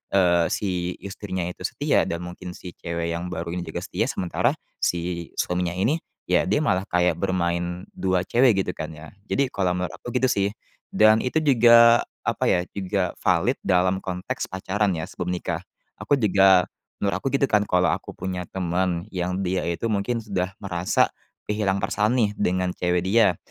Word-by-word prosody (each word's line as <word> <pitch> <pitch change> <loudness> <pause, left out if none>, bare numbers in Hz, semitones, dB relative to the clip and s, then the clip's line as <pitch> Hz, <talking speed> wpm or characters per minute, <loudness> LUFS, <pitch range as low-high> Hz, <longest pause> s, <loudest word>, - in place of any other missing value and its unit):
eee, 85 -3 +4
si 90 -3 -2
istrinya 95 -2 -4
itu - - -4
setia, - - +1
dan 85 +1 -3
mungkin 90 0 -8
si 90 - -9
cewek 85 0 -3
yang 85 +1 -3
baru 85 -1 -4
ini 90 - -3
juga - - -5
setia, - - -1
sementara 90 - 0 0.2
si 85 -1 -2
suaminya 90 -1 -1
ini, 120 - +1 0.3
ya, - - +3
dia - - +3
malah 100 -11 0
kayak 90 0 +1
bermain 90 -1 -1
2 95 -1 0
cewek, 115 -5 +3
gitu, 90 - -3
kan, 80 - -5
ya. 80 0 -11 0.2
Jadi 140 - +2
kalau 90 -2 0
menurut 90 0 -3
aku - - -6
gitu, 130 - +2
sih. 100 -6 +1 0.4
Dan 110 +1 +5
itu 125 +5 -1
juga 120 -5 +6 0.2
apa, - - +1
ya, 90 0 +2
juga 95 -2 -1
valid 95 +9 +1
dalam 95 0 +2
konteks 90 -1 -4
pacaran, 95 +2 -1
ya, 80 - -3
sebelum 90 -1 -5
nikah. 85 -2 -2 0.4
Aku 145 - +2
juga 95 -5 +5 0.3
menurut 100 -1 -1
aku, - - -1
gitu, 140 0 +2
kan, 105 -5 +3
kalau 90 -1 +3
aku - - -6
punya 95 -1 -3
teman 90 -1 -1
yang 90 0 -2
dia 90 0 0
itu 85 +6 -3
mungkin 110 +2 0
sudah 95 -3 -3
merasa 90 -3 0 0.3
kehilangan 105 -2 0
perasaan, 105 +3 +1
nih, 110 -4 +3
dengan 90 0 +1
cewek 90 0 0
dia. 95 -3 +4
95 Hz, 175 wpm, -24 LUFS, 90-105 Hz, 0.4 s, juga